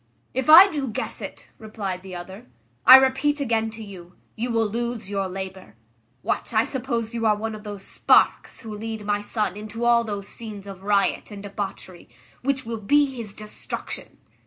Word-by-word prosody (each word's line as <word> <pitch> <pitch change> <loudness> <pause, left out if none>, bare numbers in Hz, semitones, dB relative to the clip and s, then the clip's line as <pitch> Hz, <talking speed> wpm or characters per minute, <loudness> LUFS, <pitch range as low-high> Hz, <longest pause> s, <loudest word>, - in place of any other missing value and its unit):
"If 260 +3 -1
I 345 +5 +11
do 290 -7 -3
guess 220 - -4
it," - - -8
replied 205 -4 -5
the 190 -1 -9
other, 185 +1 -9 0.4
"I 260 - +13
repeat 265 +3 +4
again 225 -5 0
to 220 0 -9
you, 180 -4 -11 0.2
you 235 +2 -3
will 225 -1 +2
lose 230 -1 -3
your 195 -1 -1
labour. 190 - -7 0.5
What, - - -2
I 220 - +5
suppose 235 -3 -3
you 230 -1 0
are 210 - +4
one 220 +1 -4
of 215 -1 -9
those 205 -2 -7
sparks - - +2
who 220 -3 -7
lead 220 0 -5
my 205 0 0
son 210 -2 -2
into 215 +3 -5
all 235 0 +5
those 205 -3 -5
scenes 210 -3 -8
of 195 -2 -9
riot 200 0 +1
and 205 -2 -9
debauchery, 195 - -6 0.3
which 270 0 -1
will 225 -1 -5
be 285 +5 +3
his 225 -5 -7
destruction? 215 0 -6
215 Hz, 185 wpm, -24 LUFS, 200-235 Hz, 0.5 s, I